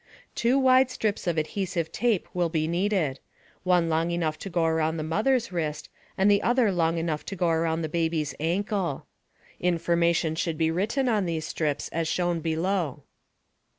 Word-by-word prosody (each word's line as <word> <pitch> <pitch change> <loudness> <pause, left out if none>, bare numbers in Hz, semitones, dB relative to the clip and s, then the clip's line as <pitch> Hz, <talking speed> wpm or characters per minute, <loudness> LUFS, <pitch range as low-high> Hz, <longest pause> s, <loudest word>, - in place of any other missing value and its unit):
Two 240 +3 +2
wide 260 -1 +5
strips 215 -6 -2
of 170 -2 0
adhesive 170 +1 -2
tape 235 -6 0
will 175 -2 +1
be 155 -1 0
needed 170 -6 0 0.4
one 180 -2 +2
long 165 +1 +1
enough 165 -3 -1
to 195 - -6
go 170 -2 +1
around 160 0 +1
the 155 - -3
mother's 225 +9 +1
wrist, 155 -3 -3 0.3
and 190 - +2
the 200 - +4
other 240 -3 +3
long 165 -2 +1
enough 165 -2 -2
to 195 - -5
go 175 -2 +1
around 165 0 0
the - - -1
baby's 160 -2 -1
ankle. 180 -1 -1 0.5
Information 170 -1 +1
should 160 0 -2
be 160 0 +2
written 220 +10 0
on 210 -6 +1
these 160 -2 -2
strips 150 -2 -2
as 165 0 -2
shown 175 0 0
below. 165 -3 -1
170 Hz, 170 wpm, -26 LUFS, 160-195 Hz, 0.5 s, wide